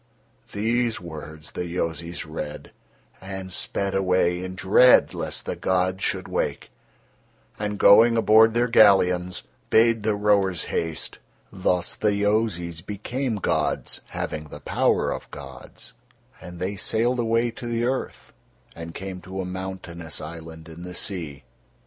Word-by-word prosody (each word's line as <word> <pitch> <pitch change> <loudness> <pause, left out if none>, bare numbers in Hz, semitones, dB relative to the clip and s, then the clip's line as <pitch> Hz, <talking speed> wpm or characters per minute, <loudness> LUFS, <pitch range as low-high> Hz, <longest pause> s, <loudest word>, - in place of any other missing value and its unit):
These 115 +3 0
words 80 -2 -9
the - - -4
Yozis 85 -1 -3
read, 75 -1 -6 0.5
and 95 0 -7
sped 100 +2 -2
away 90 -2 +1
in 95 0 -6
dread 100 +7 +5
lest - - -4
the - - -3
gods 95 +1 0
should 95 0 -1
wake, - - -2 0.9
and 105 -1 -2
going 115 +4 +7
aboard 110 0 +6
their 120 +1 +3
galleons, 90 -6 +4 0.3
bade 115 0 +4
the 105 0 +1
rowers 100 -4 +2
haste. 80 -1 -3 0.3
Thus 90 -2 0
the 105 -1 +1
Yozis 100 -5 0
became 115 +5 -3
gods, 100 - -1
having 75 0 -4
the 75 -1 -10
power - - +1
of - - -6
gods, - - -10 0.5
and 90 0 -9
they 95 +2 -3
sailed 120 +5 0
away 115 +1 +1
to 120 +1 -8
the 115 0 -1
earth, 130 +1 -3 0.4
and 85 0 -8
came 95 -1 -6
to 95 +2 -7
a 95 - -2
mountainous 90 -3 -6
island 80 0 -9
in 80 +1 -11
the 90 0 -8
sea. 80 -9 -4
95 Hz, 135 wpm, -24 LUFS, 85-110 Hz, 0.9 s, going